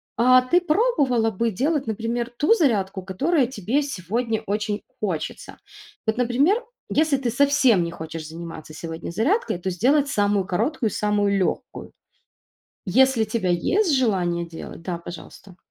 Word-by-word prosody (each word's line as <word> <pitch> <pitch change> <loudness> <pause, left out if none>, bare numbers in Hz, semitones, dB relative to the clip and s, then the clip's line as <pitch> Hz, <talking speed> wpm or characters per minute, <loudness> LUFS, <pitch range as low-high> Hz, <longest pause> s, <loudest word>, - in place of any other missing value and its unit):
А 255 +2 +6
ты 345 +8 +2
пробовала 305 - +2
бы 230 +3 -1
делать, 275 - -1
например, 230 +2 -2
ту 305 +9 +4
зарядку, 205 - +1
которая 255 - +1
тебе 245 +4 -1
сегодня 225 -2 -2
очень 210 0 -2 0.2
хочется? 185 -7 -4 0.5
Вот, 220 - +2
например, 275 - +2 0.3
если 305 -2 +2
ты 255 -3 -2
совсем 265 -7 +4
не 170 - -4
хочешь 160 -1 -7
заниматься 165 -1 -9
сегодня 165 +1 -6
зарядкой, 275 - 0
то 180 +2 -3
сделать 270 - +2
самую 205 -6 +1
короткую 230 - 0
и - - -8
самую 205 -1 +1
легкую. 185 - -3 1.0
Если 255 +3 +4
тебя 215 -3 -2
есть 310 - +2
желание 180 -8 0
делать, 165 0 -9
да, 170 0 -4
пожалуйста. 175 +2 -11
225 Hz, 140 wpm, -23 LUFS, 185-275 Hz, 1.0 s, А